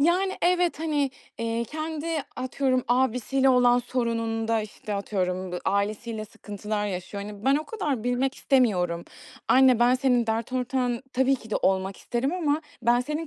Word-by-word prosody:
Yani, 365 Hz, +5 st, +2 dB
evet, 355 Hz, -3 st, +2 dB
hani, 295 Hz, -4 st, 0 dB, 0.3 s
eee, 230 Hz, 0 st, -1 dB
kendi 310 Hz, +2 st, -5 dB, 0.3 s
atıyorum, 255 Hz, 0 st, 0 dB
abisiyle 260 Hz, +2 st, +2 dB
olan 245 Hz, -1 st, +5 dB
sorununda, 230 Hz, -2 st, -1 dB
işte, 210 Hz, 0 st, -6 dB
atıyorum, 185 Hz, -2 st, -2 dB
b 180 Hz, -, -2 dB
ailesiyle 215 Hz, +3 st, -1 dB
sıkıntılar 210 Hz, 0 st, -4 dB
yaşıyor. 200 Hz, +1 st, -5 dB
Hani, 205 Hz, 0 st, -9 dB
ben 275 Hz, +1 st, +4 dB
o 305 Hz, -, -2 dB
kadar 290 Hz, -, -2 dB
bilmek 250 Hz, +2 st, 0 dB
istemiyorum. 180 Hz, -13 st, +1 dB, 0.4 s
Anne, 255 Hz, -2 st, +6 dB
ben 245 Hz, +1 st, +5 dB
senin 250 Hz, -3 st, +2 dB
dert 225 Hz, +2 st, -2 dB
ortağın 250 Hz, -1 st, -1 dB
tabii 265 Hz, +1 st, +3 dB
ki 225 Hz, -3 st, -14 dB
de -, -, +1 dB
olmak 190 Hz, 0 st, 0 dB
isterim 255 Hz, +5 st, -2 dB
ama 315 Hz, -4 st, 0 dB, 0.2 s
ben 240 Hz, +1 st, +4 dB
senin 300 Hz, +5 st, -3 dB
245 Hz, 155 wpm, -26 LUFS, 215-270 Hz, 0.4 s, Anne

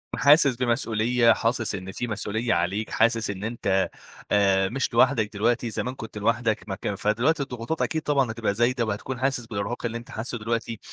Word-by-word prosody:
حاسس 145 Hz, -3 st, +5 dB
بمسؤولية، 115 Hz, -1 st, +2 dB
حاسس 115 Hz, -1 st, -1 dB
إن 95 Hz, 0 st, -6 dB
في 120 Hz, +5 st, -4 dB
مسؤولية 110 Hz, +1 st, -1 dB
عليك، 90 Hz, +6 st, -1 dB
حاسس 115 Hz, -1 st, +2 dB
إن 100 Hz, 0 st, -5 dB
أنت 100 Hz, -4 st, 0 dB, 0.4 s
آآ 95 Hz, -2 st, +3 dB
مش 130 Hz, 0 st, -2 dB
لوحدك 115 Hz, -4 st, +3 dB
دلوقتي، 115 Hz, +3 st, 0 dB
زمان 125 Hz, +4 st, -3 dB
كنت 110 Hz, -4 st, -8 dB
لوحدك 110 Hz, 0 st, 0 dB
ما 95 Hz, -, -2 dB
كان 105 Hz, 0 st, -3 dB
فدلوقتي 125 Hz, +10 st, +1 dB
الضغوطات 125 Hz, +4 st, -4 dB
أكيد 160 Hz, -, 0 dB
طبعًا 140 Hz, -6 st, +1 dB
هتبقى 110 Hz, -3 st, -1 dB
زايدة 120 Hz, +2 st, +1 dB
وهتكون 110 Hz, +4 st, -4 dB
حاسس 130 Hz, -2 st, 0 dB
بالإرهاق 110 Hz, +2 st, -4 dB
اللي 115 Hz, 0 st, -2 dB
أنت 120 Hz, +3 st, -11 dB
حاسّه 120 Hz, +2 st, -4 dB
دلوقتي 115 Hz, 0 st, -3 dB
115 Hz, 175 wpm, -25 LUFS, 105-125 Hz, 0.4 s, حاسس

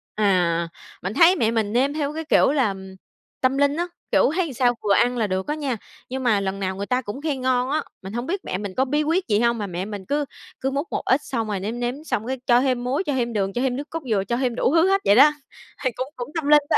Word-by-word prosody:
À, 180 Hz, -5 st, +2 dB, 0.4 s
mình 190 Hz, +3 st, -2 dB
thấy 340 Hz, +7 st, +6 dB
mẹ 225 Hz, -10 st, +1 dB
mình 220 Hz, -2 st, 0 dB
nêm 265 Hz, +4 st, +2 dB
theo 295 Hz, -1 st, -2 dB
cái 320 Hz, +1 st, -5 dB
kiểu 300 Hz, -, +4 dB
là 260 Hz, -9 st, +2 dB, 0.7 s
tâm 260 Hz, +1 st, +2 dB
linh 285 Hz, 0 st, +3 dB
á, 345 Hz, +2 st, -1 dB, 0.2 s
kiểu, -, -, +4 dB
thấy 345 Hz, -6 st, -1 dB
sao 245 Hz, 0 st, +2 dB
vừa 205 Hz, -1 st, +3 dB
ăn 245 Hz, +4 st, +3 dB
là 220 Hz, -3 st, +1 dB
được 190 Hz, 0 st, -2 dB
á 300 Hz, -, -1 dB
nha. 280 Hz, -6 st, -2 dB, 0.3 s
Nhưng 260 Hz, +1 st, -4 dB
mà 225 Hz, -5 st, +3 dB
lần 195 Hz, 0 st, -3 dB
nào 190 Hz, -1 st, -2 dB
người 200 Hz, +1 st, -4 dB
ta 250 Hz, +3 st, 0 dB
cũng 240 Hz, +3 st, -7 dB
khen 290 Hz, -4 st, -2 dB
ngon 255 Hz, 0 st, +1 dB
á, 305 Hz, +2 st, +1 dB, 0.2 s
mình 190 Hz, +1 st, -8 dB
hông 240 Hz, +2 st, -3 dB
biết 380 Hz, +6 st, -3 dB
mẹ 185 Hz, -, -2 dB
mình 200 Hz, -1 st, -6 dB
có 265 Hz, -, +2 dB
bí 295 Hz, +3 st, +1 dB
quyết 335 Hz, +5 st, 0 dB
gì 210 Hz, -3 st, +2 dB
hông 235 Hz, 0 st, +2 dB
mà 205 Hz, -2 st, -3 dB
mẹ 180 Hz, 0 st, -4 dB
mình 205 Hz, -2 st, -7 dB
cứ 290 Hz, +4 st, 0 dB, 0.4 s
cứ 270 Hz, -, 0 dB
múc 280 Hz, +5 st, -2 dB
một -, -, -1 dB
ít, 265 Hz, +3 st, +3 dB
xong 230 Hz, -5 st, -2 dB
rồi 205 Hz, -2 st, -2 dB
nếm 220 Hz, +5 st, -4 dB
nếm 245 Hz, +1 st, -1 dB
xong 245 Hz, -7 st, -2 dB
cái 260 Hz, 0 st, -3 dB
cho 240 Hz, 0 st, +5 dB
thêm 255 Hz, -2 st, 0 dB
muối, 260 Hz, +8 st, 0 dB
cho 295 Hz, -, -2 dB
thêm 240 Hz, -2 st, -1 dB
đường, 195 Hz, -2 st, -1 dB
cho 245 Hz, -, -1 dB
thêm 260 Hz, -2 st, 0 dB
nước 285 Hz, +3 st, -6 dB
cốt 330 Hz, -, -3 dB
dừa, 200 Hz, -3 st, +2 dB
cho 235 Hz, +5 st, -2 dB
thêm 250 Hz, -2 st, 0 dB
đủ 260 Hz, +4 st, +1 dB
thứ 330 Hz, +2 st, +5 dB
hết 390 Hz, 0 st, +3 dB
vậy 200 Hz, -, +5 dB
đó. 285 Hz, +5 st, +8 dB, 0.5 s
Thì 255 Hz, -, +1 dB
cũng 255 Hz, +1 st, -3 dB
cũng 245 Hz, +1 st, -6 dB
tâm 320 Hz, -3 st, -2 dB
linh 295 Hz, 0 st, +7 dB
đó. -, -, +4 dB
250 Hz, 285 wpm, -23 LUFS, 210-285 Hz, 0.7 s, đó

